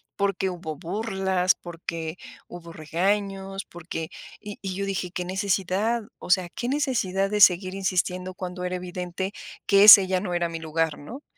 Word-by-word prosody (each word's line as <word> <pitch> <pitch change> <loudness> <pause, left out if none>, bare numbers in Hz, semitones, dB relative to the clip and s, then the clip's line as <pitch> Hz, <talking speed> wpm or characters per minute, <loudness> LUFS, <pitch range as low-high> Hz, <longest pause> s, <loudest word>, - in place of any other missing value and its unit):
porque 195 -1 0
hubo 165 -3 -6
burlas, 190 0 0
porque 165 -1 -6 0.3
hubo 170 -1 -10
regaños, 195 +4 -2
porque, 165 -1 -7 0.3
y 205 -1 -9
y 190 -2 -4
yo 200 +1 -2
dije: 190 -2 -3
"¿Qué 180 0 -4
necesidad?, 195 +4 0 0.2
o - - -10
sea, 180 -1 +3
¿qué 240 - -3
necesidad 225 -9 0
de 210 0 0
seguir 185 0 +5
insistiendo 185 -1 -1
cuando 180 -1 -6
era 180 0 -2
evidente 180 +1 -5 0.3
que 200 0 +5
ese 200 -2 +11
ya 185 0 +1
no 180 -3 -4
era 175 -1 0
mi 165 0 -5
lugar, 160 -1 -1
no?". 250 - -10
185 Hz, 165 wpm, -25 LUFS, 175-195 Hz, 0.3 s, ese